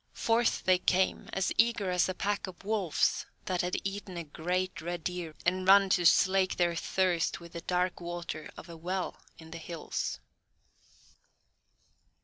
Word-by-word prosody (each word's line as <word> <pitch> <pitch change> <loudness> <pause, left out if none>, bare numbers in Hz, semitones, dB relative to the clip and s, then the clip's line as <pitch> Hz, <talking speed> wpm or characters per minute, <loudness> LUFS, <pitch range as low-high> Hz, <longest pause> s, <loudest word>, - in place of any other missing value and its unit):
Forth 230 +1 +1
they 185 -1 +4
came, 185 +1 +1
as 195 - 0
eager 230 -5 +3
as 180 +1 +2
a 185 - -2
pack 205 +1 -1
of 185 0 -11
wolves 205 -6 +1 0.2
that 180 -2 0
have 180 +1 -1
eaten 195 -2 -5
a 170 - -3
great 180 +5 -2
red 175 0 -4
deer 175 -3 -4
and 185 +1 +1
run 195 0 +7
to 175 -2 +5
slake 185 +2 +4
their 175 -1 +2
thirst 175 0 0
with 170 -1 -13
the 170 - -5
dark 180 +1 0
water 170 -3 -5
of - - -10
a 170 - -9
well 180 +3 -4 0.2
in 160 0 -13
the 165 - -6
hills. 165 -1 -4
180 Hz, 160 wpm, -30 LUFS, 170-190 Hz, 0.2 s, run